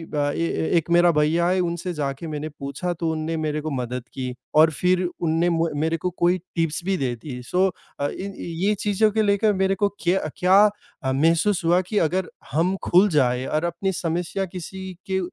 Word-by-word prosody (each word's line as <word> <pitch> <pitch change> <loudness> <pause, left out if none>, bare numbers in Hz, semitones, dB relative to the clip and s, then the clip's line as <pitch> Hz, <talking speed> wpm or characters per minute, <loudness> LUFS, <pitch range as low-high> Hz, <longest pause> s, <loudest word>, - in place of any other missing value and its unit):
अ, - - -1
ए 165 - -1
ए - - -1
एक 165 0 -1
मेरा 175 0 +6
भैया 160 +2 +2
है 185 +1 +2
उनसे 175 +1 -2
जाके 145 0 -3
मैंने 155 0 -4
पूछा 140 +6 -3
तो 165 -1 -2
उन्होंने 160 +1 -2
मेरे 155 -1 -2
को 155 - -3
मदद 125 -2 -3
की 130 -1 -4 0.2
और 160 +1 +7
फिर 180 +4 +1
उन्होंने 170 -1 0
मु 165 -1 +1
मेरे 160 +1 +1
को 180 +3 -2
कोई 175 +1 +4 0.2
टिप्स 165 -1 0
भी 195 0 +1
दे 130 -6 -1
दी। 125 +1 -8
सो 180 +9 +2 0.3
अ, 145 - +1
इन 195 +6 -6
ये 175 +5 -1
चीज़ों 210 +1 +2
को 220 +1 +1
लेकर 205 +1 +3
मेरे 190 0 +1
को 200 +1 +1
क्य 175 +3 +2 0.2
क्या 185 +2 +5 0.5
अ, 130 - 0
महसूस 165 +7 +2
हुआ 175 +2 +4
कि 215 - -1
अगर 180 +2 -2 0.2
हम 170 +7 +1
खुल 185 +4 +5
जाएँ 125 -2 +2
और 155 +1 -1
अपनी 170 +3 -1
समस्या 175 +2 -2
किसी 190 +1 -7 0.2
के 190 0 +1
170 Hz, 205 wpm, -23 LUFS, 155-185 Hz, 0.5 s, और